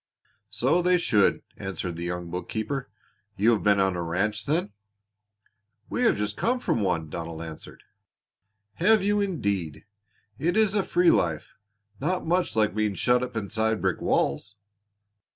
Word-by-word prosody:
"So 130 +10 +2
they 180 +1 +4
should!" 105 - +2
answered 90 -3 -4
the 85 +1 -5
young 90 -1 -4
bookkeeper. 110 +9 -4 0.5
"You 110 +5 +4
have 110 - +1
been 100 -1 +3
on 95 -1 +2
a 85 - -2
ranch 100 +5 -1
then?" 150 - 0 1.2
"We - - -1
have - - +3
just 105 0 -2
come 250 +2 0
from 115 - 0
one," 85 -5 0
Donald 85 -1 -5
answered. 80 -1 -10 0.9
"Have 215 +3 +4
you, 205 +1 +2
indeed! 100 - -2 0.5
It 175 +6 +1
is 215 -3 +4
a 205 - +3
free 175 -2 +3
life 80 -4 0 0.5
not 180 +6 -1
much 175 -2 0
like 110 -1 +2
being 105 -1 0
shut 125 +3 +2
up 125 -1 -5
inside 110 +1 -1
brick 95 -1 -1
walls." 90 +10 0
105 Hz, 150 wpm, -26 LUFS, -, 1.2 s, they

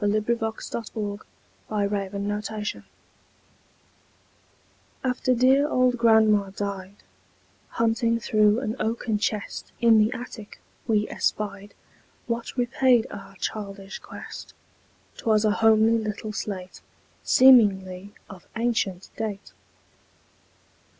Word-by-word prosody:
Eugene 210 +1 +1
Field 225 -1 -2
Little 210 -2 -4 0.5
Homer's 205 +1 -2
Slate - - -7 2.2
AFTER 255 0 +1
dear 265 +4 +4
old 255 -2 +3
grandma 220 -3 +4
died, 200 0 -6 0.7
Hunting 230 0 +1
through 215 +1 +3
an 220 -3 -3
oaken 220 -1 -1
chest 210 -1 -3
In 230 -2 +5
the 215 +1 +3
attic, 240 -3 -8 0.3
we 210 -2 +2
espied 205 -1 -3 0.5
What 235 +2 -4
repaid 245 -1 +3
our 195 0 -10
childish 195 -1 -5
quest; - - -10 0.6
'Twas 215 -1 +2
a 215 - +4
homely 225 +1 +4
little 215 0 -4
slate, 190 -4 -6 0.4
Seemingly 200 -7 +4
of 190 -4 -13
ancient 220 -5 -1
date. 215 -3 -5
215 Hz, 95 wpm, -25 LUFS, 205-230 Hz, 2.2 s, In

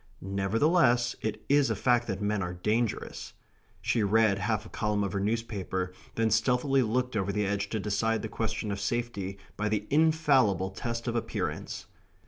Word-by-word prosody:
Nevertheless, 120 - +2
it 110 -1 -3
is 140 0 +4
a - - 0
fact 120 -1 +2
that 100 -1 -3
men 105 0 0
are 90 -1 -3
dangerous. 110 +4 -2 0.5
She 115 - +1
read 105 -1 +3
half 105 +1 -1
a - - -10
column 105 -2 0
of 100 - -2
her 100 - 0
newspaper; 100 -4 -2 0.2
then 115 -1 +1
stealthily 125 +5 +3
looked 125 +1 0
over 100 -1 0
the 105 0 0
edge 100 0 -1
to 110 - -2
decide 105 +2 0
the - - -2
question 110 -1 -3
of 100 - -3
safety 100 -3 -2 0.2
by 105 +1 0
the 105 -1 -1
infallible 140 - +3
test 115 +4 -4
of 120 - -1
appearance.... 115 - -3
110 Hz, 170 wpm, -29 LUFS, 100-120 Hz, 0.5 s, is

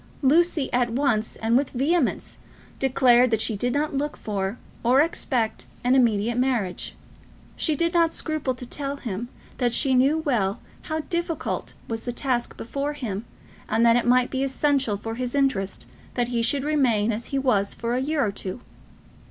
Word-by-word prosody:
Lucy 315 +1 +3
at 245 -1 +2
once 230 -3 0
and 225 +1 0
with 275 +2 +2
vehemence 285 +3 0 0.4
declared 255 -2 +4
that 225 -2 +1
she 220 0 +1
did 245 +5 -1
not 295 +3 -1
look 290 +2 -2
for 200 +1 -3 0.2
or 250 +3 +4
expect 250 -7 0 0.2
an 250 +1 +3
immediate 235 -2 +2
marriage. 240 -8 -1 0.6
She 310 - +1
did 335 +2 0
not 335 -2 +3
scruple 310 -5 -2
to 250 - -7
tell 280 +3 -4
him 235 -2 -5 0.3
that 240 -2 +1
she 270 +1 +3
knew 270 +5 +4
well 235 -10 0 0.3
how 315 0 -1
difficult 340 0 -3
was 225 -1 -3
the 245 - -4
task 245 -1 -2
before 280 +5 -3
him, 230 -7 -4 0.4
and 225 +2 +3
that 230 0 +6
it 245 0 +1
might 250 0 +4
be 265 0 -1
essential 270 -5 +1
for 225 +2 -5
his 250 +2 -3
interest 200 - 0 0.3
that 245 -1 0
he 235 -1 0
should 270 +4 +2
remain 250 -8 +2
as 225 +2 -4
he 275 - -2
was 215 -7 +1
for 235 0 -2
a 250 - 0
year 285 -1 +1
or 205 - -1
two. 195 +2 -4
250 Hz, 175 wpm, -24 LUFS, 230-280 Hz, 0.6 s, that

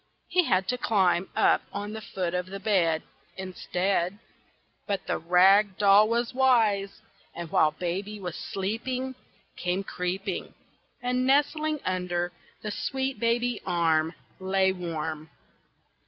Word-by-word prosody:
He 360 -1 +3
had 190 -5 +2
to 250 0 0
climb 190 -5 +2
up - - +4
on 205 +1 -5
the 220 - -6
foot 180 -4 -3
of 180 0 -1
the 195 +1 -6
bed 180 -6 +2 0.3
Instead. 185 0 -1 0.7
But 200 -3 -2
the - - -1
rag 190 +4 +5
doll 205 +1 +6
was 235 +2 0
wise, 225 -7 +2 0.3
and 170 -1 -6
while 170 -5 +4
baby 185 +6 -4
was 180 -4 -5
sleeping, 250 +7 -3 0.4
Came 180 +2 -1
creeping, 185 +1 -4 0.5
And 250 +1 0
nestling 305 +2 +2
under 180 -1 -1 0.3
the 210 - -3
sweet 265 +5 -2
baby 235 0 +1
arm, 165 -1 +1 0.2
Lay 190 0 +2
warm. 160 -3 -4
195 Hz, 125 wpm, -27 LUFS, 180-225 Hz, 0.7 s, doll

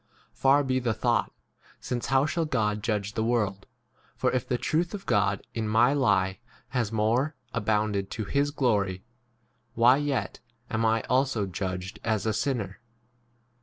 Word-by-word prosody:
Far 140 +2 +4
be 130 -1 +1
the 120 -3 -1
thought: 120 +1 +1 0.5
since 120 -1 -3
how 135 +2 +3
shall 160 +2 -1
God 105 -7 0
judge 105 -3 -2
the 110 - -1
world? 105 -4 0 0.5
7 - - -38
For - - +1
if 130 - -1
the 125 - 0
truth 165 - 0
of 200 - -8
God 100 -1 +1
in 110 -2 -2
my 115 +5 +4
lie 95 -9 +2 0.3
has 120 -5 -1
more 115 +8 +1 0.2
1 115 - -2
abounded 105 -2 0
to 110 - -4
his 140 +6 +1
glory, 105 -10 0 0.7
why 120 +3 +6
yet 145 -2 -2 0.3
am 115 0 +1
I 110 0 +2
also 130 -5 +1
judged 95 0 -4
as 110 -2 0
a - - +2
8 - - 0
sinner 110 -5 -2
115 Hz, 165 wpm, -27 LUFS, 105-130 Hz, 0.7 s, why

